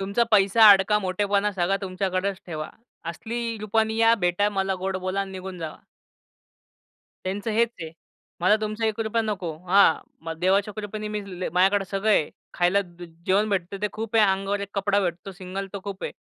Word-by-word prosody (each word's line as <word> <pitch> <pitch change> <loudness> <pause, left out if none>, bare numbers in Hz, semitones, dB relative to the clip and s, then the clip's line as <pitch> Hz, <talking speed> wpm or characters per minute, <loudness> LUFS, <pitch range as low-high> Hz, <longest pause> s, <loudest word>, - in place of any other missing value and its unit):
तुमचा 200 +4 +1
पैसा-अडका, 205 0 +6
मोठेपणा 200 +2 0
सगळा 190 +1 +1
तुमच्याकडेच 190 +1 -2
ठेवा. 155 -3 -5 0.4
असली 230 +5 -4
रूपानी 220 +1 0
या, 225 0 +5
भेटा 180 +4 +2
मला, 195 -1 -1
गोड 190 +1 -3
बोला 185 +1 -2
आणि 195 - -4
निघून 185 -1 -7
जावा. 160 -2 -7 1.5
त्यांचं 200 +4 -2
हेच 230 +2 +3
आहे. 160 -1 -5 0.5
मला 185 +5 +4
तुमचा 215 +1 -2
एक 220 0 -2
रुपया 225 +1 0
नको. 190 -7 -3 0.2
हां, 195 -3 +6 0.3
मला 165 0 -4
देवाच्या 195 +3 +2
कृपेने 210 0 -5
मी 210 0 -3 0.3
माझ्याकडे 195 +2 +3
सगळं 200 +2 0
आहे. 155 -7 +3 0.2
खायला 180 +3 +3 0.2
ज - - -10 0.2
जेवण 205 +3 +3
भेटतं 195 0 -2
ते 210 - +1
खूप 225 +1 -3
आहे. 215 - +6
अंगावर 195 +1 0
1 200 - -5
कपडा 200 0 +1
भेटतो 180 +1 -3
सिंगल 190 +1 -6
तर 200 - -4
खूप 200 -1 -6
आहे. - - -4
195 Hz, 175 wpm, -25 LUFS, 185-210 Hz, 1.5 s, पैसा-अडका